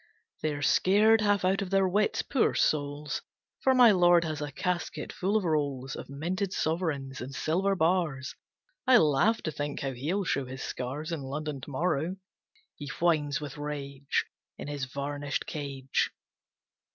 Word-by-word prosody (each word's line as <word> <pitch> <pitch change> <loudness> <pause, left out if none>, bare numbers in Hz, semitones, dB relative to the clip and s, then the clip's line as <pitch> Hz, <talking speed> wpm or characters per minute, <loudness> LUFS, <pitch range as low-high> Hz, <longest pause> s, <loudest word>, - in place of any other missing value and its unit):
They 155 -1 0
are 145 - -5
scared 215 +8 +5
half 205 -2 +2
out 190 +2 +2
of 195 - -3
their 195 0 +3
wits, 205 +3 +1
poor 270 - +1
souls. 145 0 0 0.4
For 265 -1 +3
my 245 -3 +8
lord 175 -2 +5
has 155 -2 -3
a 145 0 -4
casket 180 +4 -3
full 200 +4 +1
of 215 - -1
rolls 140 -6 -1
Of - - -8
minted 180 +7 -2
sovereigns, 155 -5 -2
and 130 +2 -6
silver 190 +8 +1
bars. 165 -6 0 0.5
I 255 -1 +8
laugh 180 +6 +3
to 155 - -1
think 145 -1 -4
how 135 - -1
he'll 160 +11 -1
show 140 -6 0
his 130 +1 -6
scars 140 +6 -4
In 165 -3 -3
London 140 +1 -4
to - - -9
morrow. 165 +4 0 0.6
He 145 - -8
whines 155 -4 +2
with 145 -1 -7
rage 140 -2 -2 0.3
In - - -7
his 145 -2 -3
varnished 145 +2 -3
cage. 135 -3 -2
150 Hz, 165 wpm, -29 LUFS, 140-185 Hz, 0.6 s, my